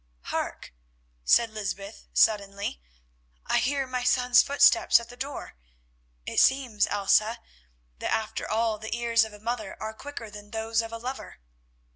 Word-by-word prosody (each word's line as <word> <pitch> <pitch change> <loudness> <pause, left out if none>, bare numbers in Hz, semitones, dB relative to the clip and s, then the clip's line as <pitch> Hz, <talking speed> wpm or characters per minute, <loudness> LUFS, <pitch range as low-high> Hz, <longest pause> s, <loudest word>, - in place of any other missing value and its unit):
"Hark!" - - -4 0.5
said 230 - +4
Lysbeth 205 -1 -6
suddenly, 200 - +1 0.6
"I - - +2
hear 275 +1 0
my 255 -1 -3
son's 250 0 +5
footsteps 285 +1 +5
at 235 - -11
the 245 - -11
door. 275 +3 -6 0.7
It - - 0
seems, 255 -6 +3
Elsa, 215 +3 +2 0.6
that, - - -3
after 220 -1 -2
all, 220 -1 0
the 220 +2 -4
ears 230 -1 +3
of 220 - -11
a 210 - -12
mother 220 -2 -4
are 220 0 -5
quicker 230 -3 -8
than 205 0 -11
those 225 +1 -1
of 225 0 -7
a 230 - -5
lover." 255 +3 -7
225 Hz, 150 wpm, -27 LUFS, 215-250 Hz, 0.7 s, son's